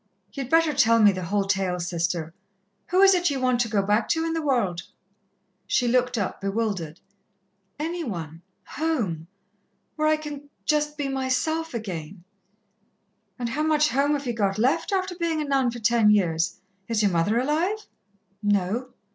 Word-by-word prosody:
"Ye'd 270 -3 -5
better 325 -1 +4
tell 230 -4 +4
me 210 -2 +7
the 185 -2 -5
whole 200 +3 +1
tale, 190 -2 0
Sister. 170 -1 -2 0.5
Who 370 +2 +3
is 390 0 +8
it 355 -2 +2
ye 280 - -1
want 255 -2 +1
to 240 - +1
go 210 -3 +1
back 210 +3 +1
to 325 -1 +1
in 330 - -1
the 325 - -1
world?" 235 - 0 0.9
She 245 - +1
looked 250 0 +2
up, 200 -4 -3
bewildered. 195 -6 -2 0.8
"Any 330 +3 -3
one 165 - -6 0.2
home. 225 - -2 0.7
Where 310 0 +2
I 310 0 +3
can 290 -2 -8 0.2
just 300 -1 0
be 290 -2 -2
myself 270 +4 -1
again 180 -5 -6 0.6
" 205 -2 -46
"And 240 -1 -3
how 275 +6 -2
much 305 -1 +3
home 285 +2 +2
have 285 -1 -2
ye 240 - -1
got 200 -3 0
left, 265 - +1
after 375 -1 0
being 335 -2 -1
a - - 0
nun 270 -3 +2
ten 235 -2 +2
years? 170 -6 +2 0.3
Is 225 -2 0
your 200 - +3
mother 175 +6 +1
alive?" 330 - 0 0.6
"No." 205 +5 0
240 Hz, 170 wpm, -25 LUFS, 195-300 Hz, 0.9 s, is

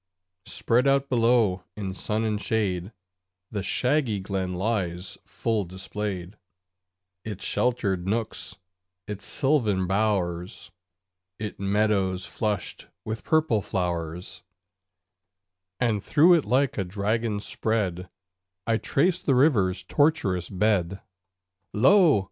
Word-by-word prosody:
Spread 120 +4 +1
out 140 0 +2
below 115 -6 +3
in 100 -3 -4
sun 105 +3 -2
and 105 -2 -1
shade, 100 -4 -1 0.6
The 105 - -2
shaggy 125 +1 +1
Glen 95 -1 -3
lies 95 -3 -2
full 110 -3 -1
displayed 95 0 -5 0.8
Its 105 -3 -6
sheltered 100 -8 0
nooks, 110 +2 -2 0.5
its 105 -1 -6
sylvan 120 -10 +1
bowers, 95 -3 -1 0.7
Its 105 -1 -6
meadows 100 -2 +1
flushed 105 -4 -3 0.2
with 110 +1 -4
purple 155 -9 +2
flowers; 90 -3 -3 1.4
And 110 -5 +1
through 160 +4 +5
it 165 -4 +3
like 130 -2 +1
a - - +1
dragon 105 +3 -1
spread, 95 -4 -2 0.6
I 115 -1 +2
trace 170 +10 +1
the 135 - +2
river's 100 - +3
tortuous 100 - +1
bed. 100 -2 +1 0.7
Lo! 160 - +5
105 Hz, 105 wpm, -26 LUFS, 95-115 Hz, 1.4 s, through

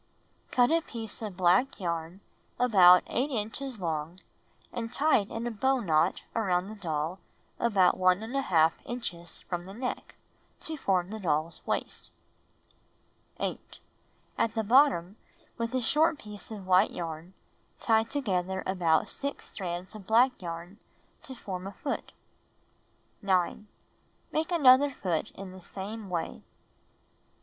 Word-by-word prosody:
Cut 245 +2 +3
a 330 0 +3
piece 230 -8 -7
of 205 -5 -6
black 190 +10 +3
yarn 170 +1 -3 0.4
about 185 -7 +7
8 270 +4 -1
inches 240 +1 -3
long 165 0 -3 0.5
and 230 -1 -4
tie 295 +3 +3
it 200 - -5
in 230 +1 -4
a 240 - -1
bow 265 +4 +1
knot 165 -4 +1
around 190 -4 +1
the 215 - -7
doll 165 -2 -3 0.4
about 200 -6 +3
1| 185 -3 +3
inches 175 -9 -6
from 175 -1 -4
the 195 +1 -10
neck, 250 +2 -5 0.5
to 320 - -4
form 190 - 0
the 220 - -5
doll's 160 -3 -1
waist. - - -3 1.3
8. - - -4 0.6
At 225 - +1
the 220 - 0
bottom, 220 - +4 0.4
with 230 +2 -2
a 255 - +1
short 310 +6 +3
piece 210 -5 -9
of 210 -4 -8
white 185 +2 +5
yarn, 165 +2 -6 0.4
tie 220 -1 +3
together 190 -8 -2
about 175 -4 +2
6 280 0 -5
strands 180 -1 -5
of 205 -3 -11
black 240 +4 +5
yarn, 175 +3 -7 0.4
to 260 - -9
form 190 -5 -6
a 200 - -7
foot. 280 - -4 1.1
9. 190 +1 0 0.6
Make 320 +3 -1
another 285 -4 +6
foot 180 - -2
in 195 -1 -8
the 185 0 -12
same 200 +3 -7
way. 170 -2 -1
10. 65 - -14
200 Hz, 140 wpm, -29 LUFS, 180-240 Hz, 1.3 s, about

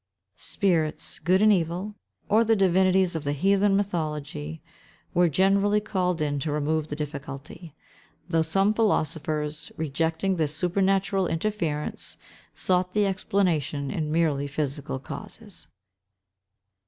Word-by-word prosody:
Spirits, 165 -6 -1
good 185 +3 +3
and 215 0 +7
evil, 180 +3 -1 0.3
or 220 +2 +4
the 225 0 +3
divinities 185 -1 +3
of 160 - -3
the 145 -1 -1
heathen 195 +5 +3
mythology, 150 - -3 0.5
were 175 0 +4
generally 195 +5 +3
called 180 -5 -1
in 145 -1 0
to 150 +2 -2
remove 150 +1 0
the 145 - -4
difficulty; 150 +1 -7 0.5
though 165 -2 +2
some 195 +6 +2
philosophers, 155 -7 -1
rejecting 160 +5 -1
this 155 -2 0
supernatural 190 +2 +1
interference, 165 -4 -2 0.4
sought 180 0 +1
the 210 -1 +3
explanation 175 -7 0
in 155 -2 -2
merely 155 -4 +1
physical 145 -1 -3
causes. 210 - -9
170 Hz, 115 wpm, -26 LUFS, 150-195 Hz, 0.5 s, and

